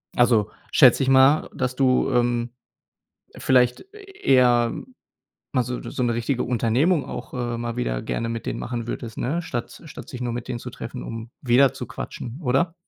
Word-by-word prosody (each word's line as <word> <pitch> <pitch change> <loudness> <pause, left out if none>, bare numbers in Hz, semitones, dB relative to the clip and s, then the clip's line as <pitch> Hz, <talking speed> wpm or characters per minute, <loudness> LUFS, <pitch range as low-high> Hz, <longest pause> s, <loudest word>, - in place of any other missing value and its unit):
also, 115 -4 +3 0.2
schätze - - +6
ich 130 - +1
mal, 135 +3 +5
dass 125 0 -2
du, 130 -1 +2
ähm, 120 0 +1 0.9
vielleicht 125 -1 +3
eher 130 - +2 0.8
mal 130 - +2
so 125 +1 -4
so - - -5
'ne 120 -2 +1
richtige 120 +2 -1
Unternehmung 125 +8 +1
auch, - - -7
äh, 120 -1 -2
mal 120 -1 -4
wieder - - -2
gerne 115 - -3
mit 115 0 -5
denen - - -2
machen 120 -1 -4
würdest, 115 -1 -6
ne? 165 +8 -1
Statt 120 0 -6
statt 155 - -10
sich 125 - -7
nur 120 -1 -2
mit 120 0 -5
denen 125 -2 -3
zu - - -8
treffen, - - -7
um 115 0 -7
wieder 130 +2 +4
zu - - -6
quatschen, 120 +4 -7
oder? 140 +5 +1
125 Hz, 175 wpm, -23 LUFS, 120-130 Hz, 0.9 s, schätze